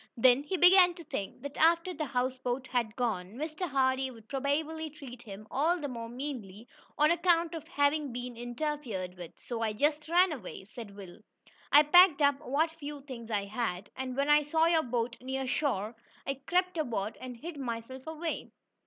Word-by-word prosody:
Then 250 +3 +6
he 335 +6 -2
began 360 0 +7
to 340 - -10
think 200 -7 -5
that 285 0 -6
after 335 +3 +3
the 315 -3 -3
houseboat 255 0 -1
had 235 -4 -1
gone, 215 -5 -2
Mr. 310 +5 -4
Hardee 265 -1 +1
would 225 -3 -14
probably 310 +4 -1
treat 275 -6 -11
him 210 -2 -10
all 320 +6 +2
the 290 - -3
more 230 -3 -6
meanly, 240 -5 -6 0.3
on 300 +2 +5
account 340 -1 +2
of 320 -1 -7
having 285 -2 +1
been 245 0 -5
interfered 240 -6 -4
with. 175 -2 -9
"So 235 -2 -5
I 220 -1 0
just 295 +6 0
ran 355 +1 +5
away," 215 -8 -7
said 210 -1 -10
Will. 190 -2 -11 0.5
"I 295 +1 +9
packed 350 +1 +7
up 285 -1 +4
what 305 +3 0
few 295 -3 -8
things 250 -5 -9
I 205 -3 0
had, 205 -3 -3
and 260 -1 -4
when 280 +1 +1
I 295 0 +6
saw 320 +2 +2
your 330 -1 +4
boat 240 -2 -2
near 265 +1 -3
shore, 240 -6 -1 0.3
I 275 0 -3
crept 360 0 +1
aboard 225 -7 -2
and 250 -2 -7
hid 315 +5 -7
myself 255 +1 -5
away. 320 +1 -4
270 Hz, 185 wpm, -30 LUFS, 235-310 Hz, 0.5 s, I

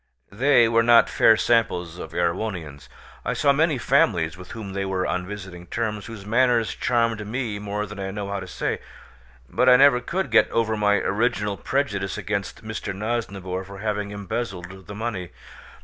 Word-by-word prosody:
They 120 +2 +4
were 115 0 +3
not 115 0 +5
fair 110 -1 +5
samples 90 -8 +1
of 80 - -7
Erewhonians. 85 - -3 0.3
I - - -1
saw 140 -1 +3
many 155 0 +2
families 90 - +2
with 90 0 -12
whom 105 -4 -7
they 100 0 -2
were 95 -1 -1
on 90 0 -2
visiting 90 -3 -8
terms, 105 -2 -3
whose 110 -3 -9
manners 120 0 +2
charmed 115 -3 0
me 110 -2 -3
more 105 0 -3
than 105 0 -9
I 95 0 -3
know 100 0 -5
how 100 0 -3
to - - -8
say, - - -2 0.7
but 125 - +3
I 125 - +9
never 135 -1 +6
could 170 +1 -3
get 115 - +5
over 110 -1 0
my 105 -1 +3
original 105 -1 0
prejudice 100 -7 -2
against 100 -1 -4
Mr. 110 -2 -4
Nosnibor 100 -4 -3
for 100 +1 -10
having 105 0 -2
embezzled 95 -3 -5
the 100 - -7
money. 105 -5 -4
105 Hz, 175 wpm, -24 LUFS, 95-115 Hz, 0.7 s, I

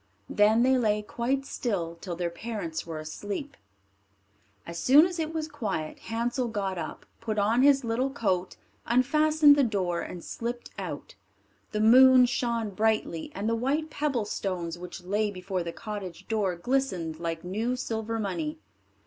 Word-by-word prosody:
Then 215 +3 +4
they 260 0 +4
lay 210 -2 +1
quite 260 +5 -1
still 190 -12 -2
till 180 -3 -4
their 175 0 -2
parents 170 -6 -5
were 165 -1 -5
asleep. 205 - -5 1.1
As 170 0 -6
soon 290 +5 +7
as 355 -1 -4
it 315 0 -1
was 320 -1 -3
quiet, 205 - -4
Hansel 235 +2 -2
got 195 -5 -2
up, 155 - -6
put 220 -2 -3
on 215 +4 +3
his 275 -1 +5
little 240 +3 0
coat, 190 -9 -1 0.3
unfastened 295 +4 +5
the 285 - +3
door, 185 -7 0
and 175 - -7
slipped 240 +1 -5
out - - -6 0.6
The 210 - -1
moon 255 +3 +8
shone 235 -3 -1
brightly, 215 -5 0
and 200 +2 -2
the 230 - +2
white 285 +7 -1
pebble 275 -8 -1
stones 180 -5 -3
which 180 +1 -9
lay 205 +3 0
before 185 -1 -3
the 170 0 -4
cottage 200 -3 -7
door 205 -5 0
glistened 180 -7 -1
like 165 -1 -3
new 220 +7 -1
silver 225 -2 -3
money. 300 - -3
220 Hz, 155 wpm, -28 LUFS, 185-255 Hz, 1.1 s, moon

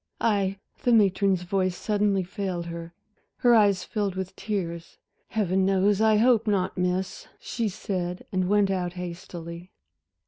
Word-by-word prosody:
"I" 200 -3 +1 0.2
The 245 - +2
matron's 195 -3 +3
voice 185 0 0
suddenly 205 -2 +1
failed 185 -2 -4
her, 170 0 -7 0.4
her 245 -2 +4
eyes 200 -4 +4
filled 205 -4 -2
with 190 0 -5
tears. 170 -5 -4 0.3
"Heaven 190 -3 +1
knows 195 +2 +3
I 220 -1 +5
hope 230 0 +4
not, 190 -3 +1
Miss," 180 +1 -2
she 230 -3 -2
said 180 -2 -4
and 185 -1 0
went 205 -1 +3
out 180 -2 -1
hastily. 175 -1 -7
190 Hz, 140 wpm, -26 LUFS, 180-205 Hz, 0.4 s, I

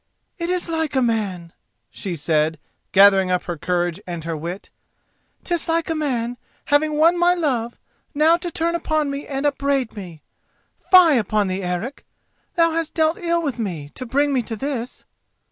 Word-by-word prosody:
"It 340 0 -2
is 360 -1 0
like 320 -3 -1
a 260 - +3
man," 195 -7 -2 0.4
she 185 -3 -5
said, 155 +1 0 0.3
gathering 195 -1 +6
up 180 -1 +1
her 175 - -4
courage 175 +2 -1
and 170 -2 -5
her 165 0 -3
wit; 170 +5 -6 0.7
"'tis 345 -1 -2
like 330 0 0
a - - +2
man, 245 -6 -2 0.3
having 305 +1 +2
won 330 +4 +4
my 350 +1 +4
love, 250 -9 -1 0.4
now 315 +3 +5
to 345 0 -4
turn 335 +1 -1
upon 310 -4 0
me 280 +1 -5
and 275 0 -3
upbraid 280 -4 0
me. 175 -7 -9 0.7
Fie 340 -8 +7
upon 210 -2 0
thee, 185 +1 -2
Eric! 180 +9 -4 0.5
thou 335 -1 +4
hast 325 -1 -2
dealt 315 0 +2
ill 340 -1 0
with 275 -5 -3
me 165 -9 -4
to 255 - -7
bring 285 +4 +1
me 260 - +2
to 225 -1 -5
this." 255 0 -5
265 Hz, 175 wpm, -21 LUFS, -, 0.7 s, Fie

